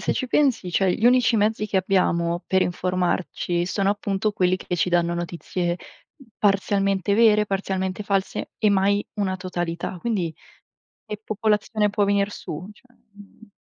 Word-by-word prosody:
se - - 0
ci 260 - -2
pensi, 260 -12 +2
cioè 185 +1 +2
gli 220 - -3
unici 245 -2 +4
mezzi 215 0 +1
che 200 - -2
abbiamo 175 -2 +1
per 190 0 +2
informarci 180 -1 -1
sono 195 +1 +1
appunto 205 0 -1
quelli 185 -2 +2
che 180 - -4
ci 170 +1 +1
danno 170 -1 +1
notizie 175 0 -3 0.6
parzialmente 195 -1 +1
vere, 210 -2 +5
parzialmente 190 0 -2
false 195 -1 -2
e 215 - +3
mai 200 +1 +2
una 195 -3 -1
totalità. 175 -1 -4
Quindi 185 -6 -2 0.7
che 210 0 -7
popolazione 215 0 0
può 205 0 0
venir 200 0 +1
su, 170 +1 -7
cioè, 250 +3 -24 0.2
mhmm 205 +1 -17
195 Hz, 150 wpm, -23 LUFS, 180-210 Hz, 0.7 s, vere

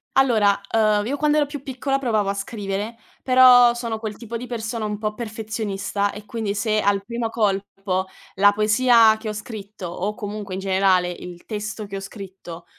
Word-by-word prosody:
Allora, 220 -7 +4
ehm, 215 -2 +2
io 280 +5 -2
quando 300 +1 +2
ero 295 - +3
più 290 -1 -7
piccola, 270 +1 -1
provavo 220 -6 0
a - - +1
scrivere, 200 +2 -4 0.3
però 250 -2 +7
sono 235 -2 -4
quel 215 -2 -5
tipo 230 0 -8
di 250 +2 -7
persona 225 -1 -4
un 210 0 -3
po' 215 0 -2
perfezionista, 210 -2 -3
e 210 0 -10
quindi 215 -2 -3
se 215 +1 +1
al 200 -1 +1
primo 235 0 -3
colpo 195 -3 -1 0.3
la 205 +2 +6
poesia 220 +2 +5
che 220 0 -6
ho - - -3
scritto, 210 -3 -7
o 190 +5 -3
comunque 205 -4 -5
in - - -4
generale 190 -2 +2
il 175 0 -10
testo 215 0 -5
che 200 -1 -8
ho - - -3
scritto, 190 -4 -10
215 Hz, 185 wpm, -22 LUFS, 200-230 Hz, 0.3 s, però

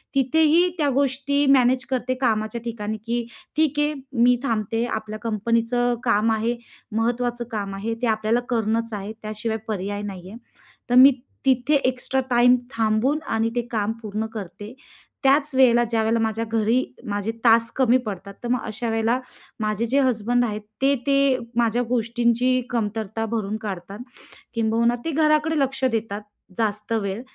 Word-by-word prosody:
तिथेही 320 +6 +4
त्या 295 -2 +1
गोष्टी 280 +1 +1
मॅनेज 255 0 +3
करते. 255 -1 -1
कामाच्या 220 -1 0
ठिकाणी, 220 -2 -4
की 235 0 -1 0.3
ठीक 305 -2 +2
आहे, 295 +1 +2 0.3
मी 245 0 +6
थांबते, 225 -1 -1
आपल्या 215 -2 -4
कंपनीचं 230 +2 0
काम 225 -1 +2
आहे, 225 +2 0 0.4
महत्त्वाचं 240 +1 0
काम 200 -3 -3
आहे, 220 +4 -3
ते 245 - +1
आपल्याला 220 +1 +1
करणंच 230 -1 0
आहे, 205 +1 -5
त्याशिवाय 215 +1 -3
पर्याय 205 -1 -3
नाही 185 -3 -7
आहे. 220 - -9 0.5
तर 245 - +2
मी 260 +2 +9 0.3
तिथे 260 +2 +3
एक्स्ट्रा 255 +1 0
टाईम 245 0 +5 0.2
थांबून 225 +5 +1
आणि 225 0 +1
ते 240 - +2
काम 215 -1 0
पूर्ण 215 +1 -3
करते. 205 +2 -8 0.5
त्याच 280 +2 +3
वेळेला 240 -2 +5
ज्यावेळेला 225 0 +1
माझ्या 225 0 -1
घरी 225 +3 +1 0.3
माझे 205 +2 -1
तास 230 0 +5
कमी 255 -2 +4
पडतात, 200 -1 -6
तर - - -3
मग 250 -1 +1
अशा 225 +2 -4
वेळेला 225 +2 +1 0.4
माझे 215 +1 -1
जे 265 +5 +2
हसबंड 245 -1 +2
आहेत, 210 -2 -3 0.2
ते 275 +1 +4
ते 275 -2 +3 0.2
माझ्या 235 0 +2
गोष्टींची 240 +1 +1
कमतरता 225 -1 -2
भरून 215 -2 -2
काढतात. 195 0 -6 0.6
किंबहुना 230 +1 +2
ते 330 - -1
घराकडे 305 0 +2
लक्ष 270 -1 -1
देतात 215 -2 -2 0.4
जास्त 210 0 -1
वेळ 200 0 -2
230 Hz, 150 wpm, -23 LUFS, 215-255 Hz, 0.6 s, मी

